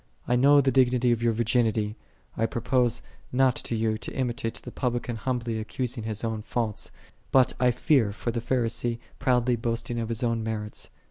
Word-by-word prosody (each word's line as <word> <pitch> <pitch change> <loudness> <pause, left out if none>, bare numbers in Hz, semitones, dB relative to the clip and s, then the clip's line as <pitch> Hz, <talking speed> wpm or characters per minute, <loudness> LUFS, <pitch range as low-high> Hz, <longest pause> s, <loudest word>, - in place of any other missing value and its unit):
5 - - -4
I - - +5
know 140 +3 +6
the 135 -1 +2
dignity 125 -2 +3
of 120 - +2
thy 115 0 +2
virginity; 110 -2 +1 0.4
I 115 - +1
propose 120 0 +1 0.3
not 130 0 +3
to 115 - -3
thee 110 -1 0
to - - -6
imitate 120 -3 -2
the - - -8
Publican 120 -2 -2
humbly 120 -1 -2
accusing 125 0 -3
his 110 -1 -3
own 110 -1 -2
faults; 110 -1 -3 0.4
but 130 -2 +5
I 125 0 +4
fear 125 -2 +2
for 115 +3 -3
the 115 0 -3
Pharisee 120 -1 0 0.2
proudly 125 -2 +2
boasting 115 0 -2
of 115 -1 -3
his 115 +1 -2
own 115 -1 +1
merits. 105 -1 -4
120 Hz, 185 wpm, -27 LUFS, 115-125 Hz, 0.4 s, know